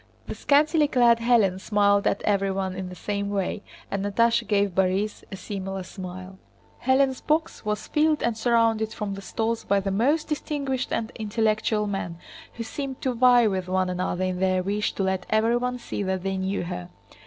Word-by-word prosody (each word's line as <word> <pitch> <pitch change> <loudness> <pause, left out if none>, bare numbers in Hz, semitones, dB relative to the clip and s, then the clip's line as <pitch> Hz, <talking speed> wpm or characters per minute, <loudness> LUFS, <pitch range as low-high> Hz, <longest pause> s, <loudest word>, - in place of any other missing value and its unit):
The - - -5
scantily 300 +1 +3
clad 240 -4 +4
Hélène 220 -6 +3
smiled 200 -1 +3
at - - 0
everyone 195 -2 0
in 185 -1 -5
the 180 - -9
same 200 +1 -3
way, 200 0 -2 0.3
and 195 0 -1
Natásha 230 +3 +2
gave 200 -2 +1
Borís 190 +3 0
a - - -4
similar 195 0 -5
smile. 185 0 -9 0.5
Hélène's 265 0 +3
box 315 +2 -1
was 210 0 -2
filled 305 0 +2
and 235 - +1
surrounded 225 -1 +2
from 205 -2 -4
the 195 - -7
stalls 225 +4 -2
by 200 0 +2
the 195 0 -2
most 275 +11 +1
distinguished 285 -4 -2
and 230 +1 -2
intellectual 215 -1 0
men, 195 -4 -4 0.4
who 235 - -4
seemed 265 +3 -5
to 260 - +1
vie 245 0 +5
with 190 -3 -1
one 185 0 0
another 180 0 -2
in 185 -1 -1
their 185 -1 +1
wish 205 +2 -1
to 195 - -2
let 190 -1 -1
everyone 240 +3 +1
see 240 - -5
that 190 -2 -2
they 195 0 -1
knew 190 +1 -2
her. 175 0 -6
205 Hz, 180 wpm, -25 LUFS, 190-235 Hz, 0.5 s, vie